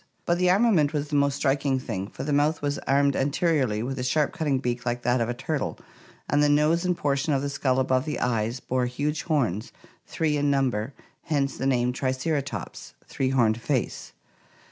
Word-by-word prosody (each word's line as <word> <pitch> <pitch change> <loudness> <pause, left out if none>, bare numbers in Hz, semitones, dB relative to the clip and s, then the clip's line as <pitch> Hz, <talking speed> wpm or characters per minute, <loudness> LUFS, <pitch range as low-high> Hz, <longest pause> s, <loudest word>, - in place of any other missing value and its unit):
But 175 0 +1
the 180 0 +3
armament 185 -7 +3
was 145 -1 -2
the 150 - -2
most 140 -1 +2
striking 140 -1 +1
thing, 95 -6 -4
for 130 - -7
the 145 +1 -1
mouth 150 +2 +1
was 145 0 -1
armed 140 0 +3
anteriorly 140 -6 +1
with 135 +2 -4
a - - -2
sharp 145 +4 +1
cutting 145 -4 0
beak 125 -1 -2
like 120 0 -2
that 125 0 +2
of 115 - 0
a - - 0
turtle, 140 +3 -3 0.5
and 145 - +2
the 150 - +4
nose 150 +4 +3
and 180 -1 0
portion 145 0 0
of 135 0 0
the 140 - -2
skull 130 -2 +1
above 130 +1 +1
the 150 - -3
eyes 115 0 -1
bore 125 -1 -1
huge 145 +5 -2
horns, 120 - -1 0.4
three 155 -2 0
in 145 0 +1
number, 135 -3 0 0.3
hence 140 -4 0
the 135 - -2
name 125 -2 +1
Triceratops 130 - -3
(three 130 - -2
horned 115 -4 +2
face). 130 0 -2
140 Hz, 195 wpm, -26 LUFS, 125-150 Hz, 0.5 s, the